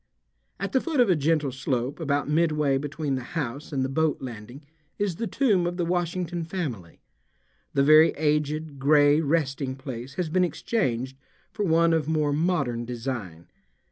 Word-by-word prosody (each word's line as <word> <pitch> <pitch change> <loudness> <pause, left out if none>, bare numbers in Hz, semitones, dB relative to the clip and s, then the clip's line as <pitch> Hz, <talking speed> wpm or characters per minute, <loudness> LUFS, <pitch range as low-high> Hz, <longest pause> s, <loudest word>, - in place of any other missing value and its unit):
At 195 +2 -3
the 260 - +2
foot 320 -5 -2
of 240 -6 +5
a - - +4
gentle 150 -2 +1
slope 130 +2 -2
about 145 -3 0
midway 150 -3 +2
between 145 0 -3
the 130 -1 -2
house 140 +1 -4
and 135 -3 0
the - - 0
boat 155 +3 0
landing 125 +3 -9 0.3
is 200 -5 -1
the 230 +1 -2
tomb 200 -5 +2
of 175 0 -4
the 175 - 0
Washington 175 0 -2
family. 145 - -5 0.7
The 140 - +4
very 155 +3 +7
aged, 150 -1 -1
gray 145 +2 +5
resting 140 -4 -1
place 130 -1 -7
has 180 0 -1
been 180 +4 +2
exchanged 130 - -1 0.3
for 210 -2 -2
one 165 -1 +3
of 160 -3 0
more 155 -2 +1
modern 145 -7 0
design. 115 -9 -5
150 Hz, 165 wpm, -26 LUFS, 135-170 Hz, 0.7 s, very